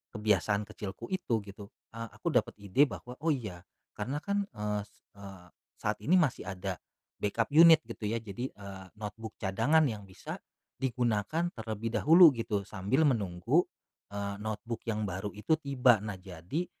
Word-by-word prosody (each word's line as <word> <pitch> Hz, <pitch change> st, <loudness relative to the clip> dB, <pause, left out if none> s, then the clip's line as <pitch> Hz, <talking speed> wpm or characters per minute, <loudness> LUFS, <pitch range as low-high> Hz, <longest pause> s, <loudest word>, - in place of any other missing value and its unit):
kebiasaan 105 Hz, -1 st, +1 dB
kecilku 105 Hz, +2 st, -7 dB
itu 125 Hz, -, 0 dB
gitu, 100 Hz, 0 st, -10 dB, 0.2 s
eee, 115 Hz, 0 st, -6 dB
aku -, -, -2 dB
dapat -, -, +2 dB
ide 100 Hz, +8 st, +3 dB
bahwa, 125 Hz, -, -8 dB
"Oh 165 Hz, -, +1 dB
iya 105 Hz, -10 st, -5 dB, 0.4 s
karena 125 Hz, +7 st, -2 dB
kan," 200 Hz, +2 st, 0 dB
eee 105 Hz, -1 st, -2 dB, 0.4 s
eee, 95 Hz, -2 st, -11 dB, 0.3 s
"saat -, -, -1 dB
ini 180 Hz, +5 st, +5 dB
masih 150 Hz, -9 st, +1 dB
ada 95 Hz, -1 st, -4 dB, 0.4 s
backup 110 Hz, +3 st, 0 dB
unit." 160 Hz, 0 st, +9 dB
Gitu 105 Hz, -, -7 dB
ya, 115 Hz, -, 0 dB
jadi, 115 Hz, +4 st, -5 dB
eee, 100 Hz, -2 st, -9 dB
notebook 110 Hz, +1 st, -6 dB
cadangan 115 Hz, +12 st, +3 dB
yang 105 Hz, -3 st, -5 dB
bisa 95 Hz, -, -8 dB, 0.4 s
digunakan 125 Hz, +6 st, 0 dB
terlebih 110 Hz, 0 st, -4 dB
dahulu 165 Hz, +2 st, +8 dB
gitu 110 Hz, -4 st, -1 dB
sambil 105 Hz, +10 st, +1 dB
menunggu, 115 Hz, -, +2 dB, 0.5 s
eee, 100 Hz, 0 st, -3 dB
notebook 110 Hz, +2 st, -4 dB
yang 110 Hz, -1 st, -1 dB
baru 95 Hz, +1 st, -3 dB
itu 105 Hz, +10 st, 0 dB
tiba. 125 Hz, -6 st, +4 dB
Nah, 105 Hz, -2 st, -5 dB
jadi 90 Hz, -, -4 dB
110 Hz, 155 wpm, -31 LUFS, 100-130 Hz, 0.5 s, unit